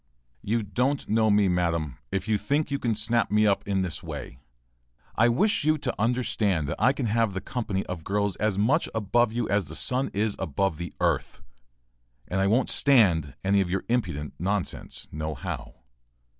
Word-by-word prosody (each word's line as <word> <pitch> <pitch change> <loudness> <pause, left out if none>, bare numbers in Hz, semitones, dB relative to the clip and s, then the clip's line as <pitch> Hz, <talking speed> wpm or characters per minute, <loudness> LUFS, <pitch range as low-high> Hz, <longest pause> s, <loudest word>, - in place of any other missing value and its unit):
] - - -42
You 115 -1 +2
don't 125 +7 -1
know 110 +1 +3
me, 105 -1 +4
madam, 85 -6 0
if 95 +1 -2
you 110 -2 +1
think 145 +4 0
you 140 - 0
can 115 -3 0
snap 115 +2 +1
me 105 +1 +3
up 100 -1 +1
in 95 -2 +1
this 90 -4 -4
way. 65 - -7 0.7
I 120 +2 +4
wish 200 - +2
you 155 +1 +3
to 130 -4 -2
understand 110 - +1
that 75 - -4
I 125 +4 +5
can 135 -2 -3
have 115 -1 +1
the - - -1
company 100 -2 -3
of 90 -3 -6
girls 100 +1 0
as 105 -2 0
much 130 +11 +2
above 110 +2 +2
you 120 0 -1
as 100 -2 +1
the 80 - -7
sun 130 +8 +1
is 105 +1 0
above 85 +2 -1
the 85 -3 -5
earth, - - -1 0.8
and 95 +1 -1
I 95 - +3
won't 120 +6 +2
stand 90 - +3
any 100 +1 +3
of 90 - -1
your 95 +1 -1
impudent 75 - -1
nonsense 100 +1 -3
no 75 0 -4
how. - - -6
105 Hz, 190 wpm, -26 LUFS, 95-120 Hz, 0.8 s, I